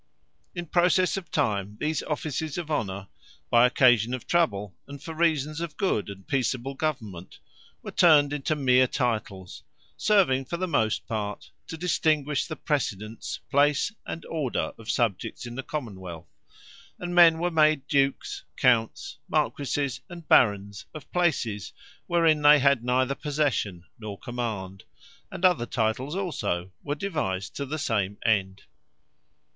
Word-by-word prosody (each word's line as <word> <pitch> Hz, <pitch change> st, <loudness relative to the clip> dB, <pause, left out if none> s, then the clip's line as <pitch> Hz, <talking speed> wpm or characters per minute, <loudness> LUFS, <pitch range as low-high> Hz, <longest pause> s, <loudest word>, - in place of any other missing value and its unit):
In 175 Hz, -1 st, -4 dB
processe 180 Hz, +2 st, +2 dB
of 195 Hz, -3 st, -6 dB
time 105 Hz, -7 st, -1 dB
these 155 Hz, -1 st, -1 dB
offices 155 Hz, 0 st, -3 dB
of 165 Hz, -3 st, -4 dB
Honour, 100 Hz, -8 st, -2 dB, 0.4 s
by 120 Hz, +1 st, +6 dB
occasion 120 Hz, -2 st, +4 dB
of 130 Hz, -, -9 dB
trouble, 105 Hz, -, 0 dB
and 140 Hz, 0 st, -9 dB
for 160 Hz, +3 st, -7 dB
reasons 155 Hz, -2 st, 0 dB
of 170 Hz, -3 st, -5 dB
good 185 Hz, -, 0 dB
and 95 Hz, -1 st, -10 dB
peacable 135 Hz, -1 st, -1 dB
government, 110 Hz, -, -4 dB, 0.5 s
were -, -, -6 dB
turned 150 Hz, -5 st, +5 dB
into 145 Hz, +2 st, -1 dB
meer 130 Hz, -3 st, +4 dB
Titles; 110 Hz, -8 st, -3 dB, 0.4 s
serving 175 Hz, -11 st, +3 dB
for 170 Hz, -, -4 dB
the 185 Hz, +1 st, -2 dB
most 110 Hz, -10 st, 0 dB
part, 105 Hz, -2 st, -4 dB, 0.2 s
to 160 Hz, -, -6 dB
distinguish 155 Hz, -4 st, +1 dB
the 155 Hz, -, -5 dB
precedence, 110 Hz, -, -3 dB
place, 145 Hz, +5 st, +3 dB
and 165 Hz, -, -7 dB
order 150 Hz, -7 st, -2 dB
of 115 Hz, 0 st, -11 dB
subjects 115 Hz, 0 st, -1 dB
in 120 Hz, -, -7 dB
the 135 Hz, -, -4 dB
Common 125 Hz, -9 st, -5 dB
wealth: 85 Hz, -4 st, -9 dB, 0.7 s
and 175 Hz, 0 st, -5 dB
men 170 Hz, -2 st, +7 dB
were 175 Hz, +2 st, -1 dB
made 155 Hz, -3 st, +3 dB
Dukes, 140 Hz, -1 st, 0 dB
Counts, 115 Hz, -3 st, +1 dB
Marquises, 140 Hz, -2 st, -1 dB
and 170 Hz, -3 st, -10 dB
Barons 100 Hz, -2 st, +3 dB
of 155 Hz, -, -10 dB
Places, 130 Hz, -, 0 dB, 0.3 s
wherein 165 Hz, -3 st, +3 dB
they 150 Hz, 0 st, +8 dB
had 140 Hz, -3 st, +3 dB
neither 130 Hz, +2 st, +1 dB
possession, 140 Hz, -, -1 dB, 0.2 s
nor 105 Hz, -3 st, -7 dB
command: 110 Hz, -6 st, -5 dB, 0.5 s
and 185 Hz, -, -1 dB
other 175 Hz, -10 st, +3 dB
Titles 125 Hz, +6 st, -1 dB
also, 95 Hz, -, -2 dB
were 145 Hz, 0 st, -3 dB
devised 145 Hz, -, -3 dB
to 140 Hz, -, -3 dB
the 155 Hz, +3 st, -3 dB
same 105 Hz, -8 st, -1 dB
end. 95 Hz, -3 st, +1 dB
135 Hz, 145 wpm, -26 LUFS, 110-155 Hz, 0.7 s, they